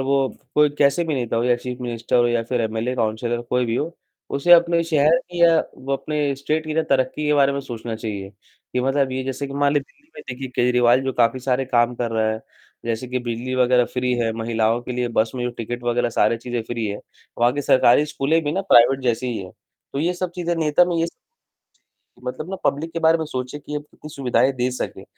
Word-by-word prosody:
वो 135 Hz, 0 st, +1 dB, 0.3 s
कोई 150 Hz, -1 st, +4 dB
कैसे 140 Hz, +4 st, +3 dB
भी 155 Hz, -3 st, -1 dB
नेता 120 Hz, -3 st, -2 dB
हो 115 Hz, -, +1 dB
या 125 Hz, -1 st, +3 dB
चीफ 125 Hz, +1 st, -6 dB
मिनिस्टर 120 Hz, 0 st, -2 dB
हो 120 Hz, 0 st, +4 dB
या 120 Hz, -1 st, +1 dB
फिर 120 Hz, 0 st, -1 dB
एमएलए, 115 Hz, +3 st, -2 dB
काउंसलर, 120 Hz, +1 st, -1 dB
कोई 125 Hz, +1 st, 0 dB
भी 115 Hz, +1 st, -1 dB
हो, 165 Hz, +3 st, -3 dB, 0.3 s
उसे 140 Hz, +5 st, +3 dB
अपने 170 Hz, 0 st, +6 dB
शहर 155 Hz, 0 st, +3 dB
की 175 Hz, -1 st, -1 dB
या 165 Hz, -1 st, +6 dB, 0.2 s
वो 135 Hz, +1 st, -5 dB
अपने 145 Hz, 0 st, -1 dB
स्टेट 155 Hz, +3 st, -1 dB
की 155 Hz, -, -3 dB
ना 160 Hz, -, +2 dB
तरक्की 135 Hz, +3 st, +1 dB
के 150 Hz, -, +3 dB
बारे 140 Hz, -1 st, +4 dB
में 140 Hz, -, -2 dB
सोचना 115 Hz, -3 st, -6 dB
चाहिए। 100 Hz, -3 st, -5 dB, 0.4 s
कि 125 Hz, -, 0 dB
मतलब 135 Hz, 0 st, +1 dB
ये 130 Hz, 0 st, -2 dB
जैसे 135 Hz, +1 st, -3 dB
कि 135 Hz, -, -8 dB
मान 145 Hz, 0 st, +2 dB
लीजिए 145 Hz, -1 st, -2 dB
दिल्ली 295 Hz, +2 st, -32 dB
में -, -, -9 dB
देखिए 130 Hz, +1 st, -5 dB
केजरीवाल 125 Hz, 0 st, +3 dB
जो 135 Hz, 0 st, -2 dB
काफ़ी 120 Hz, +2 st, +2 dB
सारे 130 Hz, +1 st, 0 dB
काम 120 Hz, -1 st, +2 dB
कर 120 Hz, -1 st, -2 dB
रहा 110 Hz, -1 st, +1 dB
है, 110 Hz, -, -5 dB, 0.4 s
जैसे 115 Hz, +2 st, -2 dB
कि 125 Hz, -, -1 dB
बिजली 120 Hz, +1 st, -4 dB
वग़ैरह 125 Hz, -1 st, +4 dB
फ्री 125 Hz, 0 st, 0 dB
है, 115 Hz, -2 st, 0 dB
महिलाओं 115 Hz, +1 st, 0 dB
के 125 Hz, -, -5 dB
लिए 125 Hz, -1 st, -1 dB
बस 110 Hz, 0 st, +2 dB
में 125 Hz, -1 st, -3 dB
जो 125 Hz, -, -1 dB
टिकट 120 Hz, +1 st, -6 dB
वग़ैरह 120 Hz, 0 st, +1 dB
सारे 115 Hz, -, +2 dB
चीज़ें 120 Hz, -1 st, -4 dB
फ्री 115 Hz, -1 st, -3 dB
है। 100 Hz, 0 st, -4 dB, 0.4 s
वहाँ 120 Hz, +1 st, +4 dB
की 145 Hz, +1 st, -3 dB
सरकारी 130 Hz, +2 st, +5 dB
स्कूलें 155 Hz, +3 st, 0 dB
भी 145 Hz, -, -1 dB
ना 190 Hz, -, 0 dB
प्राइवेट 125 Hz, +3 st, +6 dB
जैसी 120 Hz, 0 st, 0 dB
ही 120 Hz, -3 st, -2 dB
हैं, 95 Hz, -, -10 dB, 0.4 s
तो 140 Hz, -, -3 dB
ये 175 Hz, +3 st, +1 dB
सब 180 Hz, 0 st, -3 dB
चीज़ें 175 Hz, -1 st, -1 dB
नेता 160 Hz, +2 st, +3 dB
में 175 Hz, -1 st, -1 dB
ये 165 Hz, 0 st, +1 dB, 1.2 s
मतलब 140 Hz, +7 st, -5 dB
ना 195 Hz, -, -3 dB
पब्लिक 160 Hz, +4 st, 0 dB
के 165 Hz, -, -2 dB
बारे 165 Hz, 0 st, +4 dB
में 160 Hz, -, -2 dB
सोचे 130 Hz, 0 st, -5 dB
कि 150 Hz, +1 st, -11 dB
ये 150 Hz, -, -1 dB
उतनी 150 Hz, +1 st, -13 dB
सुविधाएँ 135 Hz, 0 st, +2 dB
दे 125 Hz, 0 st, -1 dB
सके। 125 Hz, -, -5 dB
130 Hz, 235 wpm, -22 LUFS, 120-145 Hz, 1.2 s, अपने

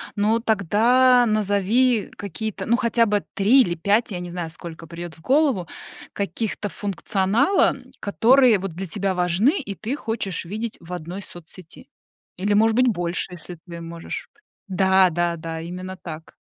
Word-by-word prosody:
ну 215 Hz, +3 st, +2 dB
тогда 235 Hz, +4 st, +4 dB
назови 215 Hz, +2 st, +2 dB
какие-то, 200 Hz, 0 st, -5 dB
ну, 235 Hz, -, +4 dB
хотя 235 Hz, -1 st, +2 dB
бы 205 Hz, -1 st, +1 dB
3 230 Hz, +7 st, +5 dB
или 175 Hz, -7 st, +1 dB
5, 205 Hz, +7 st, +1 dB
я 180 Hz, -, -3 dB
не 175 Hz, 0 st, -6 dB
знаю, 170 Hz, -2 st, -5 dB
сколько 165 Hz, -1 st, -9 dB
придёт 170 Hz, 0 st, -8 dB
в 160 Hz, -, -19 dB
голову, 265 Hz, -, +2 dB, 0.5 s
каких-то 205 Hz, +2 st, -3 dB
функционала, 205 Hz, -, +1 dB, 0.2 s
которые 235 Hz, +2 st, +4 dB
вот 195 Hz, 0 st, -4 dB
для 190 Hz, +4 st, -5 dB
тебя 195 Hz, +1 st, -2 dB
важны 180 Hz, -, +2 dB
и 235 Hz, -9 st, -5 dB
ты 220 Hz, +7 st, -4 dB
хочешь 225 Hz, -, -3 dB
видеть 215 Hz, +5 st, -5 dB
в 170 Hz, +1 st, -9 dB
одной 180 Hz, +3 st, -6 dB
соцсети. 175 Hz, 0 st, -10 dB, 0.5 s
Или, 200 Hz, +3 st, 0 dB
может 220 Hz, +2 st, +4 dB
быть, 255 Hz, +1 st, +4 dB
больше, 175 Hz, -4 st, -1 dB
если 175 Hz, 0 st, -7 dB
ты 170 Hz, -1 st, -8 dB
можешь. 165 Hz, 0 st, -7 dB, 0.4 s
Да-да-да, 175 Hz, -4 st, +2 dB
именно 185 Hz, +2 st, -7 dB
так. 160 Hz, -2 st, -9 dB
195 Hz, 150 wpm, -23 LUFS, 175-225 Hz, 0.5 s, 3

